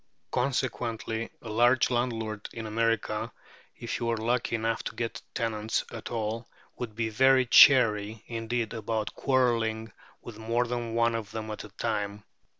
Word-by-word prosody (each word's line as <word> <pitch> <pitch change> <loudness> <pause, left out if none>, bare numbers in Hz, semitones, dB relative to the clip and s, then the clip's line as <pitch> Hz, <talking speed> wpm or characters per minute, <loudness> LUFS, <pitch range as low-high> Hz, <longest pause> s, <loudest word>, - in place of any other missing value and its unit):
Consequently 120 -3 -1
a 115 - -7
large 120 +4 +4
landlord 115 -4 -2
in 115 -1 -6
America, 110 -1 0 0.5
if 120 - -4
he - - -5
were 115 -1 0
lucky 120 +2 0
enough 115 0 -1
to - - -5
get 115 0 -3
tenants 110 -1 -1
at 115 - -7
all, 115 0 -3 0.3
would 115 -4 -6
be 115 0 -1
very 130 +3 +4
chary 110 -4 +6
indeed 115 0 -3
about 110 -1 -2
quarrelling 115 -4 +1 0.3
with 115 -2 -9
more 115 +2 0
than 120 -1 -3
one 115 0 +3
of 110 -3 -4
them 110 0 -5
at 105 - -6
a - - -11
time. 105 -1 -3
115 Hz, 150 wpm, -28 LUFS, 110-120 Hz, 0.5 s, chary